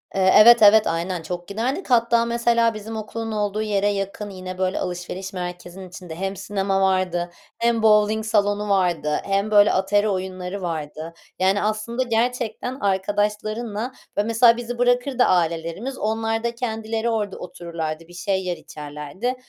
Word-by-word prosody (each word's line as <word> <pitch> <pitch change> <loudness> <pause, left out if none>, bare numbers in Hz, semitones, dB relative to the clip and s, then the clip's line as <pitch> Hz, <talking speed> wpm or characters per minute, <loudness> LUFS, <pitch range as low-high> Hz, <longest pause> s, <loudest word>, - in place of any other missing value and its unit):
Eee, 190 -1 +4
evet, 235 +2 +8
evet, 215 +1 +7
aynen, 170 +1 -2
çok 175 +2 -6
giderdik. 255 - -3
Hatta, 235 -1 +3
mesela, 235 -1 +2
bizim 215 +1 -7
okulun 225 +1 -5
olduğu 210 0 -1
yere 205 -2 0
yakın 200 +1 -3
yine, 185 -1 -7
böyle, 185 0 -1
alışveriş 180 +2 -5
merkezinin 180 +1 -7
içinde 180 -3 -9
hem 195 +3 -3
sinema 195 0 -1
vardı, 185 -2 +1 0.3
hem 235 -1 +1
bovling 215 0 +4
salonu 210 -1 +1
vardı 175 -6 +1
hem 200 +2 -1
böyle 205 0 +6
atari 205 +2 +2
oyunları 185 0 -4
vardı. 160 -1 -5 0.3
Yani 190 +2 +2
aslında 215 +4 -1
gerçekten 245 +1 -2
arkadaşlarınla, 210 +4 -1 0.3
böyle 205 +1 +1
Mesela, 230 +1 +5
bizi 240 0 -5
bırakırdı 245 +1 +2
ailelerimiz, 170 +8 0
onlar 225 +1 -1
da 235 0 -2
kendileri 225 -1 -2
orada 210 -4 -2
otururlardı, 165 -2 -6
bir 175 - -15
şey 190 +2 -1
yer, 175 -1 -2
içerlerdi. 150 - -5
205 Hz, 150 wpm, -22 LUFS, 185-225 Hz, 0.3 s, evet